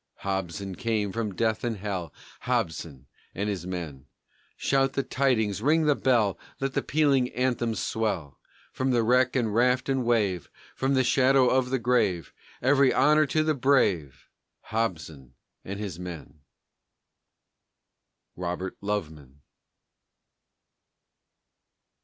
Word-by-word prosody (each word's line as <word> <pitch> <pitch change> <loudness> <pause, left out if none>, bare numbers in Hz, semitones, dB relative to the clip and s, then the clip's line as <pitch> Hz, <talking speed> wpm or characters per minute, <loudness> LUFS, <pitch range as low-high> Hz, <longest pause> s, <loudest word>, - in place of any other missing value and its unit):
Hobson 95 -1 -3
came 110 -2 -1
from 110 -2 -3
death 110 0 0
and 115 -3 -2
hell, 95 -5 -4 0.3
Hobson 75 -4 -3 0.3
and 100 +2 -2
his 95 -4 -3
men, 80 -7 -6 0.5
Shout 135 0 +1
the 135 - 0
tidings, 110 -8 0
ring 155 +5 +3
the 150 - +5
bell, 120 -8 +1 0.2
Let 135 0 -2
the - - 0
pealing 140 -4 +2
anthems 120 -3 0
swell; 100 -11 -2 0.3
Back - - -35
from 130 -1 +1
wreck 125 +3 +3
and 115 -5 0
raft 125 +3 +2
and 135 -1 +1
wave, 105 -8 0 0.3
From 135 +1 0
the 130 - +3
shadow 130 0 +4
of 130 0 +2
the 130 - +1
grave, 115 -8 0 0.3
Every 135 0 +4
honor 150 +3 +4
to 155 +3 +1
the 155 0 +1
brave. 100 - +1 0.3
Hobson 80 - -4 0.3
and 100 +1 -6
his 95 -5 -5
men. 80 -4 -8 2.0
ROBERT 90 +1 -4
LOVEMAN. 75 -9 -5
110 Hz, 125 wpm, -27 LUFS, 90-130 Hz, 2.0 s, the